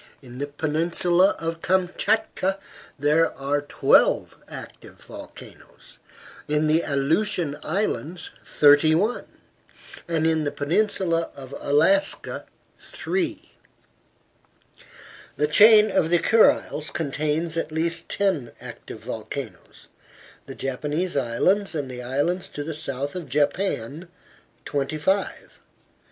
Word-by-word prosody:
In 125 Hz, 0 st, -11 dB
the 145 Hz, -, -2 dB
peninsula 170 Hz, +5 st, +2 dB
of 165 Hz, 0 st, -4 dB
Kamchatka 190 Hz, +2 st, 0 dB, 0.4 s
there 150 Hz, +3 st, +2 dB
are 140 Hz, +1 st, -1 dB
twelve 145 Hz, -, +2 dB
active -, -, -10 dB
volcanoes, -, -, -14 dB, 0.5 s
in 150 Hz, +1 st, +1 dB
the 155 Hz, +2 st, +3 dB
Aleutian 150 Hz, +2 st, 0 dB
Islands 175 Hz, -1 st, -3 dB
thirty 145 Hz, +2 st, +5 dB
one, 215 Hz, +8 st, 0 dB, 0.8 s
and 165 Hz, -2 st, 0 dB
in 160 Hz, -1 st, +2 dB
the 145 Hz, -, 0 dB
peninsula 170 Hz, +1 st, 0 dB
of 135 Hz, -1 st, -10 dB
Alaska 165 Hz, +8 st, +1 dB, 0.3 s
three. 330 Hz, -4 st, -4 dB, 1.8 s
The 150 Hz, -, +1 dB
chain 215 Hz, +6 st, +6 dB
of 180 Hz, -4 st, +1 dB
the 175 Hz, -, +4 dB
Kuriles 170 Hz, -5 st, +2 dB
contains 155 Hz, +2 st, -2 dB
at 165 Hz, -2 st, -3 dB
least 165 Hz, +1 st, 0 dB
ten 180 Hz, -12 st, -1 dB
active -, -, -10 dB
volcanoes; -, -, -8 dB, 0.6 s
the -, -, -8 dB
Japanese 150 Hz, +7 st, -3 dB
Islands 165 Hz, -, +1 dB
and 140 Hz, -4 st, -3 dB
the 125 Hz, 0 st, -7 dB
islands 145 Hz, +9 st, -1 dB
to 145 Hz, -, -6 dB
the 160 Hz, +2 st, -5 dB
south 140 Hz, -1 st, -3 dB
of 175 Hz, -6 st, -7 dB
Japan 145 Hz, -, -1 dB, 0.6 s
twenty 145 Hz, +1 st, -2 dB
five. 190 Hz, +6 st, -2 dB
160 Hz, 110 wpm, -24 LUFS, 145-185 Hz, 1.8 s, chain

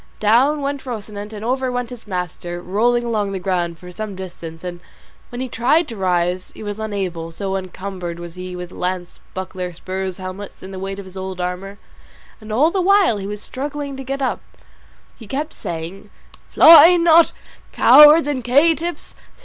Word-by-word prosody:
Down 260 Hz, +8 st, +3 dB
went 280 Hz, 0 st, -3 dB
Rocinante, 210 Hz, -2 st, -6 dB
and 215 Hz, +1 st, -7 dB
over 260 Hz, +1 st, 0 dB
went 245 Hz, -1 st, -3 dB
his 240 Hz, -3 st, -11 dB
master, 175 Hz, -2 st, -4 dB
rolling 230 Hz, +7 st, +1 dB
along 215 Hz, -4 st, -1 dB
the 190 Hz, -, -3 dB
ground 175 Hz, -3 st, -1 dB
for 180 Hz, +1 st, -11 dB
some 205 Hz, +2 st, -6 dB
distance; 170 Hz, -3 st, -9 dB
and 175 Hz, -1 st, -6 dB, 0.5 s
when 245 Hz, +1 st, -6 dB
he 260 Hz, -, -2 dB
tried 260 Hz, +8 st, +2 dB
to 230 Hz, -, -6 dB
rise 180 Hz, -1 st, -1 dB
he -, -, -9 dB
was 205 Hz, 0 st, -5 dB
unable, 190 Hz, -6 st, -4 dB
so 190 Hz, +3 st, -3 dB
encumbered 185 Hz, -2 st, -5 dB
was 175 Hz, -1 st, -8 dB
he 180 Hz, 0 st, -7 dB
with 180 Hz, 0 st, -7 dB
lance, 180 Hz, -1 st, -4 dB, 0.2 s
buckler, 185 Hz, -1 st, -5 dB
spurs, 185 Hz, +2 st, -5 dB
helmet, 190 Hz, +1 st, -7 dB
and 190 Hz, +1 st, -9 dB
the 190 Hz, -, -6 dB
weight 195 Hz, +1 st, -5 dB
of 200 Hz, -, -8 dB
his 185 Hz, 0 st, -13 dB
old 190 Hz, -1 st, -5 dB
armour; 180 Hz, +3 st, -4 dB, 0.6 s
and 215 Hz, -1 st, -10 dB
all 290 Hz, +9 st, +3 dB
the 380 Hz, -, 0 dB
while 390 Hz, -, +4 dB
he 195 Hz, -1 st, -5 dB
was 210 Hz, +1 st, -6 dB
struggling 285 Hz, +1 st, -5 dB
to 270 Hz, -, -7 dB
get 275 Hz, +1 st, -3 dB
up 260 Hz, -, -1 dB, 0.8 s
he 225 Hz, -, -11 dB
kept 295 Hz, +6 st, -3 dB
saying, 170 Hz, +5 st, -7 dB, 0.4 s
"Fly 330 Hz, +2 st, +9 dB
not, 335 Hz, -1 st, +5 dB, 0.4 s
cowards 300 Hz, +2 st, +8 dB
and 285 Hz, -4 st, -2 dB
caitiffs! 325 Hz, +7 st, +1 dB
205 Hz, 180 wpm, -20 LUFS, 185-260 Hz, 0.8 s, Fly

